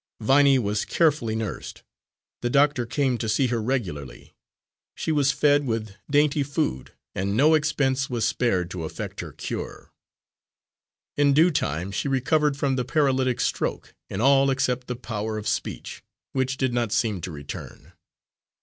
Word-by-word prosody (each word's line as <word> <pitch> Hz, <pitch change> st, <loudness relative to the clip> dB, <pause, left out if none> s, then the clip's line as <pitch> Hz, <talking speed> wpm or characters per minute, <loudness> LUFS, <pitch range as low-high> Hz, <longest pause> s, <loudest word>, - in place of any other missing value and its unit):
Viney 135 Hz, +4 st, +5 dB
was 105 Hz, -3 st, 0 dB
carefully 150 Hz, -9 st, +1 dB
nursed. 110 Hz, -3 st, -5 dB, 0.6 s
The 120 Hz, -, 0 dB
doctor 140 Hz, -2 st, +3 dB
came 130 Hz, -1 st, 0 dB
to 110 Hz, -, -2 dB
see 110 Hz, +6 st, +2 dB
her 115 Hz, -1 st, -1 dB
regularly. 90 Hz, -, -4 dB, 0.6 s
She -, -, -2 dB
was 145 Hz, -3 st, +3 dB
fed 145 Hz, -1 st, +3 dB
with 110 Hz, -2 st, -2 dB, 0.2 s
dainty 145 Hz, 0 st, +3 dB
food, 140 Hz, -, -2 dB, 0.2 s
and 100 Hz, +3 st, -1 dB
no 150 Hz, +5 st, +5 dB
expense 140 Hz, -3 st, +1 dB
was 120 Hz, -3 st, 0 dB
spared 95 Hz, -8 st, 0 dB
to 90 Hz, -3 st, -5 dB
effect 80 Hz, -, -6 dB
her -, -, -6 dB
cure. -, -, -6 dB, 1.3 s
In 145 Hz, -1 st, +4 dB
due 165 Hz, +4 st, +5 dB
time 90 Hz, -, -2 dB
she 105 Hz, -, -2 dB
recovered 140 Hz, +2 st, +1 dB
from 135 Hz, -2 st, 0 dB
the 125 Hz, -, 0 dB
paralytic 130 Hz, -3 st, +1 dB
stroke, -, -, -2 dB, 0.2 s
in 95 Hz, -, -3 dB
all 135 Hz, +1 st, +5 dB
except 125 Hz, -1 st, 0 dB
the 125 Hz, -, -3 dB
power 110 Hz, -3 st, -4 dB
of 105 Hz, -, -5 dB
speech, -, -, -3 dB, 0.3 s
which 130 Hz, 0 st, -1 dB
did 130 Hz, -2 st, 0 dB
not 120 Hz, -3 st, 0 dB
seem 105 Hz, -5 st, 0 dB
to 90 Hz, -, -5 dB
return. 70 Hz, -2 st, -9 dB
130 Hz, 155 wpm, -25 LUFS, 110-140 Hz, 1.3 s, Viney